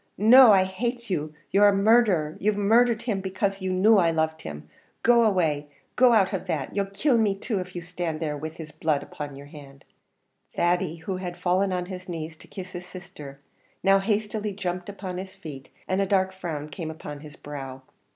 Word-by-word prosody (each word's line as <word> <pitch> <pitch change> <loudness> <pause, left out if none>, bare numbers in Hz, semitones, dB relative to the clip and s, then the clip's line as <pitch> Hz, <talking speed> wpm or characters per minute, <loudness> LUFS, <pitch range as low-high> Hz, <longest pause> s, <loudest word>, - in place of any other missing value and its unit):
no; 240 +3 +8
I 190 -2 +6
hate 235 +4 -4
you 155 -3 -2 0.2
you're 205 +1 +6
a 205 - +5
murdherer; 195 -7 +3
you've 210 +1 +1
murdhered 230 +3 +3
him 210 -5 -1
because 195 +1 -2
you 190 0 -2
knew 200 +3 +5
I 170 -2 +3
loved 160 -1 -1
him; 75 0 -8 0.4
go 235 0 +5
away 165 -9 +1 0.3
go 250 -1 +6
out 210 -4 +3
of 190 0 -3
that; 155 -4 -3
you'll 200 -1 0
kill 230 +6 +1
me 205 -3 +2
too 200 +1 -3
if 180 0 -7
you 175 - -5
stand 170 -2 -4
there 155 -2 -2
with 155 +2 -6
his 155 -2 -9
blood 155 -1 -1
upon 145 -2 -7
your 140 +1 -10
hand!" 140 -2 -14 0.7
Thady, 175 -1 +1
who 175 +3 -5
had 180 -1 -6
fallen 185 +2 +1
on 180 -1 -2
his 185 0 -8
knees 160 -1 -5
to - - -17
kiss 185 -2 -8
his 180 0 -8
sister, 145 -7 -11 0.4
now 195 +1 +5
hastily 210 +1 -1
jumped 180 -1 -4
upon 190 -2 -6
his 190 0 -8
feet, 135 -4 -10 0.2
and 185 +1 +1
a 195 - 0
dark 190 -1 +1
frown 155 -5 -5
came 160 +2 -6
upon 150 -2 -8
his 150 0 -12
brow. 135 -2 -8
185 Hz, 200 wpm, -25 LUFS, 155-200 Hz, 0.7 s, no